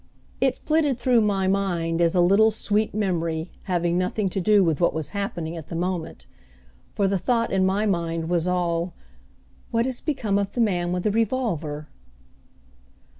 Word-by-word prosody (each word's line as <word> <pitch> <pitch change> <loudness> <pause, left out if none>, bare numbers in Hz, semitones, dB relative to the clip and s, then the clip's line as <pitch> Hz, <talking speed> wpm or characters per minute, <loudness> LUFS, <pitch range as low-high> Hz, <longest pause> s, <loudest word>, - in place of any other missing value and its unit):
It - - +2
flitted 305 -5 +1
through 245 -1 +3
my 195 -3 +1
mind 175 -4 0
as 170 +1 +2
a 180 - +4
little, 200 +5 +5
sweet 215 0 0
memory, 170 -5 -1
having 175 -1 0
nothing 190 +2 -1
to 190 - -2
do 205 +1 +4
with 165 -2 0
what 170 - +2
was 155 -2 -3
happening 175 -5 -4
at 160 -3 -8
the - - -6
moment, 175 -1 -3 0.7
for 200 - +2
the 195 -1 0
thought 230 +2 0
in 190 -1 +2
my 200 +3 +1
mind 165 -4 -1
was 175 0 0
all, 175 -1 -1 0.7
"What 230 +1 +1
has 260 -2 -3
become 230 -10 0
of 200 -1 -3
the - - -4
man 175 -5 +1
with 180 0 -1
the 210 - +1
revolver?" 195 - -1
185 Hz, 175 wpm, -24 LUFS, 170-215 Hz, 0.7 s, little